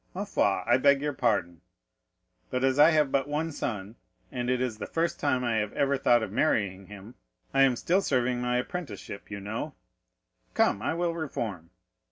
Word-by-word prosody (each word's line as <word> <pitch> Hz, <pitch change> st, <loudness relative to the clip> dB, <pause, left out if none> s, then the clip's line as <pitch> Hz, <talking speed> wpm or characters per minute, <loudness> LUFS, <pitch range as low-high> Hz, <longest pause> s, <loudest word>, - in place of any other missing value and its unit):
Ma 195 Hz, -, -2 dB
foi, 100 Hz, -, +1 dB
I 120 Hz, -, +4 dB
beg 140 Hz, +1 st, +4 dB
your 145 Hz, +1 st, -2 dB
pardon, 95 Hz, -10 st, 0 dB, 0.9 s
but 125 Hz, -, -2 dB
as 135 Hz, +1 st, +2 dB
I 150 Hz, +2 st, +8 dB
have 150 Hz, -4 st, +2 dB
but 135 Hz, 0 st, +1 dB
one 155 Hz, +3 st, -2 dB
son, 105 Hz, -6 st, -5 dB, 0.3 s
and 125 Hz, -2 st, -3 dB
it 125 Hz, 0 st, +1 dB
is 125 Hz, -4 st, -2 dB
the -, -, -5 dB
first 165 Hz, +1 st, -1 dB
time 130 Hz, -3 st, +1 dB
I 115 Hz, -2 st, 0 dB
have 105 Hz, -1 st, -1 dB
ever 140 Hz, 0 st, +1 dB
thought 120 Hz, -3 st, +3 dB
of 105 Hz, -, -5 dB
marrying 100 Hz, -3 st, 0 dB
him, 105 Hz, +3 st, -11 dB, 0.4 s
I 135 Hz, -, +4 dB
am 135 Hz, -2 st, +5 dB
still 180 Hz, +10 st, +1 dB
serving 125 Hz, -5 st, 0 dB
my 125 Hz, 0 st, 0 dB
apprenticeship, 125 Hz, -, -6 dB
you 100 Hz, -1 st, -5 dB
know; 105 Hz, +3 st, -5 dB, 0.8 s
come, 100 Hz, -, +2 dB
I 140 Hz, +7 st, -1 dB
will 170 Hz, 0 st, 0 dB
reform." 115 Hz, -, -4 dB
125 Hz, 190 wpm, -28 LUFS, 105-145 Hz, 0.9 s, I